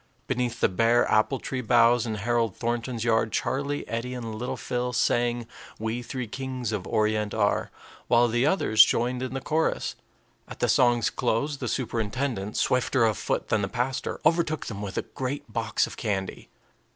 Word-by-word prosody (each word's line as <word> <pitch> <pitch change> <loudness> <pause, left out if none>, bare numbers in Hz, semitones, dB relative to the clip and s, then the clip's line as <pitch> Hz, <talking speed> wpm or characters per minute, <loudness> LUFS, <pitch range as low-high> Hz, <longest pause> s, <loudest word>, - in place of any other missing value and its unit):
Beneath 120 -1 -2
the - - +5
bare 115 +6 +3
apple 110 +5 +3
tree 130 0 -4
boughs 120 0 +4
in 110 - -2
Harold 115 0 0
Thornton's 120 0 -2
yard, 115 -1 +2
Charlie, 140 +6 -2
Eddie, 120 +2 -3
and 115 -3 -5
little 125 +4 -4
Phil 125 0 -2
sang, 120 0 +1 0.3
"We 110 +2 -3
three 125 +1 -4
kings 130 0 -4
of 100 -4 -3
Orient 105 -1 0
are," 105 -2 +1 0.4
while 120 0 +5
the 120 +2 +1
others 140 - +5
joined 125 +2 0
in 130 +1 -4
the 135 - -3
chorus. 160 +4 0 0.5
At - - -9
the - - +2
song's 120 -2 +3
close, 140 +6 0
the - - -4
superintendent, 115 -3 -2
swifter 125 -1 +2
of 110 -2 +2
foot - - -2
than 110 - +2
the 100 - 0
pastor, 125 +5 -2
overtook 155 -1 +2
them 105 -3 -6
with 100 -2 -5
a - - 0
great 130 -3 -5
box 115 -1 +1
of - - -10
candy. 95 -4 -3
120 Hz, 175 wpm, -26 LUFS, 110-130 Hz, 0.5 s, the